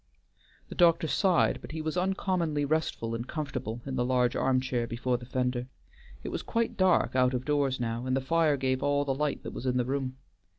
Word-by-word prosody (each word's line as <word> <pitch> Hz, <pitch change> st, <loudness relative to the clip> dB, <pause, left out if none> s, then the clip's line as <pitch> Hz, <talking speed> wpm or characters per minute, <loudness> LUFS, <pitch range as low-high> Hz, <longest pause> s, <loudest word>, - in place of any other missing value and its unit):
The -, -, -6 dB
doctor 170 Hz, -2 st, +4 dB
sighed, 185 Hz, +1 st, +2 dB
but -, -, -9 dB
he 160 Hz, -, -4 dB
was 155 Hz, +1 st, -2 dB
uncommonly 180 Hz, -5 st, 0 dB
restful 145 Hz, -6 st, -1 dB
and 115 Hz, +2 st, -4 dB
comfortable 130 Hz, -7 st, -4 dB
in 135 Hz, -1 st, -3 dB
the 125 Hz, -, +2 dB
large 125 Hz, -1 st, +2 dB
arm 130 Hz, -1 st, +2 dB
chair 125 Hz, -2 st, -1 dB
before 125 Hz, +2 st, -1 dB
the 120 Hz, -, -11 dB
fender. 125 Hz, -1 st, -1 dB, 0.6 s
It -, -, -4 dB
was -, -, -3 dB
quite 230 Hz, -1 st, -1 dB
dark 185 Hz, -7 st, +3 dB
out 125 Hz, 0 st, +3 dB
of 125 Hz, +1 st, -3 dB
doors 140 Hz, -3 st, +1 dB
now, 120 Hz, +1 st, -2 dB
and 130 Hz, +1 st, +1 dB
the -, -, +2 dB
fire 155 Hz, +2 st, +2 dB
gave 130 Hz, -1 st, 0 dB
all 145 Hz, 0 st, +1 dB
the 135 Hz, -, 0 dB
light 150 Hz, +1 st, -2 dB
that -, -, -6 dB
was 130 Hz, -, -5 dB
in 125 Hz, 0 st, +1 dB
the 125 Hz, -, +1 dB
room. 130 Hz, 0 st, -2 dB
130 Hz, 215 wpm, -29 LUFS, 125-155 Hz, 0.6 s, doctor